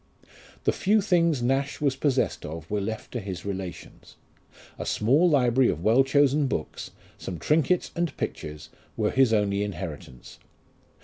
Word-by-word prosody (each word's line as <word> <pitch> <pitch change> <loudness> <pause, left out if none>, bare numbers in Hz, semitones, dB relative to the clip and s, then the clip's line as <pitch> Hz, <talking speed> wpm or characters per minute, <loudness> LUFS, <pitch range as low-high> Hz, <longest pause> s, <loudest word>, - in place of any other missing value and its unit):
The - - +3
few 210 +3 +2
things 170 - +2
Nash 135 +3 0
was 140 -3 +1
possessed 135 -2 0
of 80 +2 -8
were 105 -1 0
left 110 +4 -5
to 125 - -3
his 95 -3 -6
relations. 95 -4 -7 0.6
A - - -3
small 140 +11 +3
library 130 -3 +3
of 80 - -3
well 115 +6 +5
chosen 140 +1 +3
books, 80 - -4 0.3
some 90 - -5
trinkets 155 - +1
and 170 -3 -2
pictures, 75 0 -5 0.3
were - - +1
his 130 -3 +3
only 100 -2 +1
inheritance. 85 -11 -7
125 Hz, 145 wpm, -26 LUFS, 100-145 Hz, 0.6 s, well